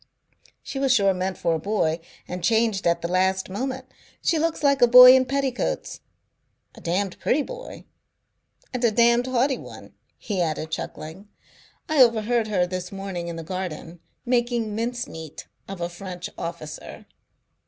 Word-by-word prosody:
"She 270 - -5
was 270 -1 +2
sure 200 -6 +4
meant 185 0 -3
for 170 - 0
a 160 - -1
boy 170 -4 0 0.3
and 180 0 -6
changed 220 -3 +2
at 170 0 +1
the - - 0
last 190 +1 0
moment. 260 +5 -4 0.4
She 330 - +2
looks 325 -1 -1
like 280 -2 +3
a 245 - +7
boy 250 +1 +10
in 260 0 +3
petticoats, 270 -1 -2 0.7
a - - -14
damned 185 +2 -2
pretty 295 +3 +1
boy - - -9 0.9
and 250 -1 -3
a 235 - +5
damned 235 +3 +3
haughty 260 +1 +1
one," - - -12 0.2
he 195 -4 -3
added, 160 -1 -2
chuckling. 160 +5 -6 0.6
"I 310 -3 +3
overheard 230 -1 +3
her 190 -4 +1
this 180 0 -5
morning, 195 -3 -5
in 170 - -5
the 165 - -6
garden, 175 -1 -6 0.3
making 240 -3 0
mincemeat 225 - -5 0.2
of 195 -2 -7
a 170 - 0
French 175 0 -8
officer." 165 -2 -7
200 Hz, 155 wpm, -24 LUFS, 175-245 Hz, 0.9 s, boy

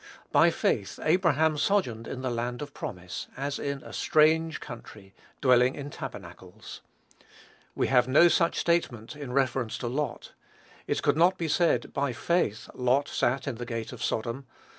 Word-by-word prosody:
"By - - +6
faith - - -1
Abraham 160 -3 +2
sojourned 125 - 0
in 130 - -6
the 130 - -1
land 120 +3 -3
of 145 - -10
promise, 90 - -6
as 140 +1 -3
in 140 -1 -4
a - - -11
strange 160 +1 +3
country, 105 -6 -11 0.3
dwelling 125 0 +4
in 145 0 -7
tabernacles." - - -9 0.9
We - - +1
have 125 -1 +4
no 150 +7 +6
such 170 0 +2
statement 150 -8 0
in 145 -4 -7
reference 130 -3 0
to 120 - -4
Lot. 140 +2 -3 0.5
It - - -1
could - - +2
not 180 +3 +4
be 165 - -2
said, 170 +2 +1
"By 140 -2 -1
faith 120 - 0
Lot 130 +3 +1
sat 130 +3 0
in 130 -5 -3
the 120 - -5
gate 115 0 -4
of 125 - -10
Sodom." 120 +4 -2
135 Hz, 160 wpm, -28 LUFS, 120-155 Hz, 0.9 s, By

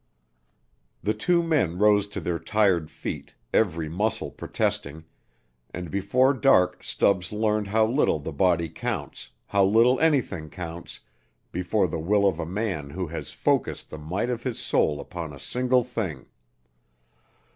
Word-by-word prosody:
The 105 +4 +1
two 175 +5 +2
men 145 - +1
rose 105 0 +4
to 100 -1 -6
their 85 -1 -2
tired 90 -3 +2
feet, - - -7 0.2
every 85 -7 +1
muscle 105 +7 -2
protesting, 80 +3 -3 0.7
and 90 -2 -6
before 125 +8 +3
dark 90 -10 +3
Stubbs 90 -3 +1
learned 105 -1 0
how 110 +2 +3
little 120 - +2
the 75 +2 -6
body 85 +1 +2
counts, 85 -2 -5 0.2
how 100 -1 +2
little 115 +6 +4
anything 125 - +1
counts, 85 -1 -8 0.5
before 90 +3 +1
the 80 - -4
will 100 +5 +2
of 95 - 0
a 80 - -3
man 90 -6 -3
who 90 +5 -3
has 80 - -6
focused - - -1
the 80 - -7
might 95 +11 -2
of 120 -1 -3
his 125 -2 -3
soul 75 -1 +1
upon 85 -2 -6
a 70 - -11
single 125 - +1
thing. 110 - -4
95 Hz, 145 wpm, -26 LUFS, 85-110 Hz, 0.7 s, rose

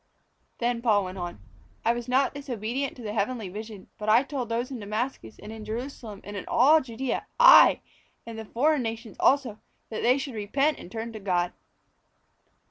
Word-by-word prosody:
'" - - -44
Then 240 0 -1
Paul 215 -4 +3
went 185 +1 -7
on: 175 -1 -5 0.5
"I 230 - +4
was 240 0 -5
not 265 +2 +2
disobedient 260 -1 -3
to 245 - -11
the 210 -1 -4
heavenly 215 -1 -2
vision; 210 0 -8
but 210 0 -2
I 230 +4 +6
told 270 -4 -4
those 235 +3 -2
in 255 - -5
Damascus 215 - -4
and 210 - -10
in 220 -1 -8
Jerusalem 225 -2 -6
and 205 - -8
in 200 - -4
all 285 +7 +5
Judæa, 255 0 -3
aye! - - +8 0.4
and 230 - -7
the 220 - -7
foreign 290 +6 +1
nations 225 -2 -5
also, 255 -6 +2 0.3
that 220 - -3
they 250 +3 +4
should 275 -1 -5
repent 270 +8 0
and 175 - -11
turn 225 +1 -5
to 220 - -7
God. 180 -3 0
230 Hz, 190 wpm, -27 LUFS, 210-255 Hz, 0.5 s, aye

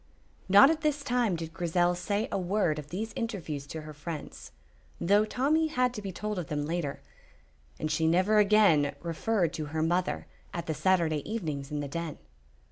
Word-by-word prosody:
Not 205 +10 +8
at 320 -1 -2
this 295 -2 0
time 245 -7 +1
did 165 -1 -6
Grizel 175 +1 +1
say 200 +4 -1
a - - 0
word 180 -4 0
of 150 0 -9
these 215 +5 -4
interviews 165 - -4
to 160 +2 -6
her 155 0 -9
friends, 150 - -7 0.5
though 205 +4 +4
Tommy 295 +8 +1
had 250 -5 +1
to 210 - -6
be 195 -1 -5
told 210 +1 -3
of 170 - -5
them 150 -3 -2
later, 160 -3 -3 0.8
and 155 - -2
she 160 +1 +1
never 185 +6 +4
again 200 -9 +4
referred 175 +1 0
to 155 - -3
her 155 +2 -2
mother 175 +3 0 0.3
at 170 - -3
the 160 - -1
Saturday 165 -3 +2
evenings 155 -11 -3
in 150 -1 -3
the 145 - -4
Den. 165 +1 -4
175 Hz, 185 wpm, -29 LUFS, 155-215 Hz, 0.8 s, Not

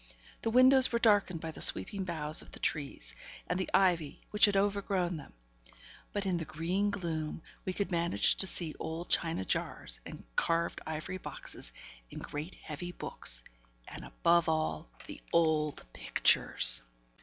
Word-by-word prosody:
The 225 - -1
windows 255 +2 +7
were 235 - +1
darkened 205 -7 +2
by 160 - -5
the - - -9
sweeping 200 -3 +2
boughs 155 -3 +2
of - - -14
the - - -8
trees, 135 - -2 0.3
and 180 - -2
the 190 - -2
ivy 175 -6 +2
which 210 +1 +7
had 205 -2 +2
overgrown 195 -3 0
them; 145 - -11 0.8
but, 205 -1 -2
in 185 -2 0
the 165 - -3
green 180 +7 -1
gloom, 165 -6 -4 0.2
we 185 - -2
could 200 0 -2
manage 170 - +3
to 190 - +1
see 165 -4 -1
old 160 +2 -5
china 165 - +2
jars - - -2
and - - -10
carved 165 0 0
ivory 160 +4 -5
boxes, - - -7 0.4
and - - -8
great 150 +5 -6
heavy 175 +4 -7
books, - - 0 0.4
and, - - -9
above 170 - +2
all, 155 +1 -2 0.2
the - - -9
old 155 -3 +1
pictures! - - +3
170 Hz, 155 wpm, -31 LUFS, 155-195 Hz, 0.8 s, windows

